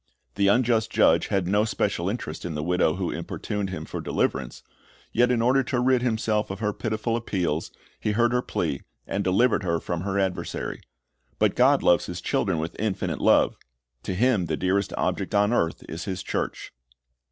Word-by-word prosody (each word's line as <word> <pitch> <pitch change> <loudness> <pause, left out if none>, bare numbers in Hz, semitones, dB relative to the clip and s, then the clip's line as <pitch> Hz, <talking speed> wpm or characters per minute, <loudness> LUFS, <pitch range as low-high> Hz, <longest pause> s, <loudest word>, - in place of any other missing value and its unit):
The 100 0 +2
unjust 115 +1 +3
judge - - +4
had 95 -2 0
no 105 +3 +3
special 100 -4 -1
interest 100 -8 -5
in 85 -3 -4
the 75 - -2
widow 90 -1 +2
who 90 -2 -2
importuned 105 -2 -4
him 80 -4 -5
for - - -5
deliverance; 65 -3 -2 0.5
yet 120 +1 +4
in 120 -2 +2
order 130 +3 +4
to 125 -1 -1
rid 125 0 +3
himself 110 -3 0
of 95 - -4
her 105 -2 0
pitiful 110 +2 -2
appeals, 90 -9 -1 0.3
he 105 - -1
heard 120 +2 +3
her 125 - +2
plea, 75 - -2 0.2
and 100 - -2
delivered 100 +5 +3
her 85 -3 0
from 85 0 -3
her 95 +1 -2
adversary. 95 -2 -2 0.6
But - - +2
God - - +4
loves 90 - +4
His 90 -1 -5
children 90 0 0
with 80 +2 -3
infinite 105 -2 -2
love. - - +4 0.4
To 95 - -4
Him 110 -4 +2
the - - -1
dearest 95 +2 0
object - - -1
on 105 +3 +3
earth 85 -8 0
is 80 - -6
His 95 -2 -4
church. - - -3
100 Hz, 185 wpm, -25 LUFS, 90-115 Hz, 0.6 s, judge